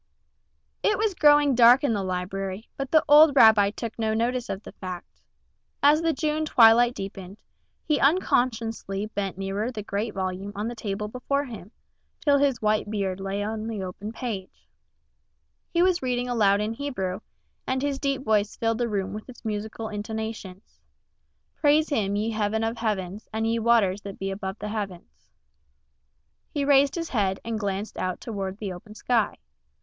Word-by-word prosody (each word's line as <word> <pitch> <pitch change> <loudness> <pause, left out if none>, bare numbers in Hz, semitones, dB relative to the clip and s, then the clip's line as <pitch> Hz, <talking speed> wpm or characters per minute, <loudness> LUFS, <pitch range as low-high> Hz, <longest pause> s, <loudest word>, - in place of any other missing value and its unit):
IT 420 - +2
was 430 -1 +1
growing 295 -4 +5
dark 245 +2 +6
in 275 -5 +2
the 205 - -1
library, 190 +2 -4
but 275 -1 -4
the 315 +1 +4
old 295 0 +7
rabbi 220 -5 +7
took 230 +2 -7
no 220 -1 0
notice 240 +2 -1
of 195 +2 -4
the - - -10
fact. 185 -2 -9 0.6
As 295 +2 +6
the 330 0 +2
June 310 0 -1
twilight 240 -3 +5
deepened, 195 0 -7 0.4
he 300 -2 +1
unconsciously 230 - +1
bent 200 -3 -4
nearer 195 +5 -2
the 215 -4 -6
great 210 +2 -3
volume 190 +1 -3
on 210 +2 -3
the 240 - -4
table 210 -2 -4
before 280 +5 -2
him, 215 -7 -9 0.5
till 285 -1 +3
his 275 -5 +1
white 215 0 +1
beard 195 -3 -2
lay 195 +1 -3
on 220 +1 -4
the 215 -4 -4
open 195 +3 -6
page. 225 -6 -6 1.0
He 340 0 +2
was 365 -1 +2
reading 250 -1 -1
aloud 210 -4 +3
in 215 +2 -2
Hebrew, 225 -9 -3 0.5
and 260 +1 -1
his 280 -1 -1
deep 275 -1 -1
voice 215 -3 +1
filled 225 0 0
the 240 -1 0
room 195 -2 -2
with 215 +4 -8
its 245 -1 -13
musical 220 +1 -4
intonations: 210 - -6 0.8
"Praise 305 +1 +3
Him, 205 -8 0
ye 215 +2 -1
heavens 220 0 0
of 225 +1 -2
heavens, 205 -3 -3
and 220 0 -1
ye 230 +1 +1
waters 220 -4 +3
that 200 -1 -8
be 195 0 -3
above 195 0 -5
the 210 - -5
heavens." 190 - -6 1.2
He 285 -2 -2
raised 280 0 +4
his 335 -1 -3
head 195 -5 0
and 225 -1 -2
glanced 200 0 -3
out 185 -1 -2
toward 195 -4 -5
the 205 -3 -5
western 195 +4 -11
sky. 230 -1 0
220 Hz, 170 wpm, -25 LUFS, 200-250 Hz, 1.2 s, old